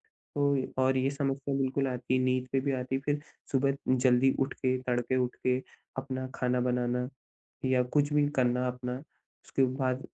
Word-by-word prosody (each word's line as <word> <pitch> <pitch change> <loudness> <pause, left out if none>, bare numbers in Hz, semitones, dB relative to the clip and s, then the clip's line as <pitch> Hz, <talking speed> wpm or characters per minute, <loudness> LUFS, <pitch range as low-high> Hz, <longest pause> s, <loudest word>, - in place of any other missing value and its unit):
तो 140 -2 0 0.2
और 130 0 +3
ये 130 +1 +2
समस्या 135 0 -1
बिल्कुल 135 0 +1
आती 125 0 -2
है - - +2
नींद 130 0 +1
में 130 - +2
भी 140 - +1
आती 130 +1 -2
है 135 - -1
फिर 145 0 0 0.3
सुबह 135 0 +2 0.2
जल्दी 130 +1 +4
उठ 135 0 +1
के, 130 -1 0
तड़के 125 0 0
उठ 125 - -8
के 125 0 +3 0.4
अपना 130 -1 -3
खाना 125 0 +1
बनाना 125 0 0 0.6
या 130 -1 +3
कुछ 145 +3 +1
भी 150 -1 +4
करना 125 0 +2
अपना। 125 0 -3 0.5
उसके 135 - 0
बाद 130 -1 0
130 Hz, 175 wpm, -30 LUFS, 125-135 Hz, 0.6 s, जल्दी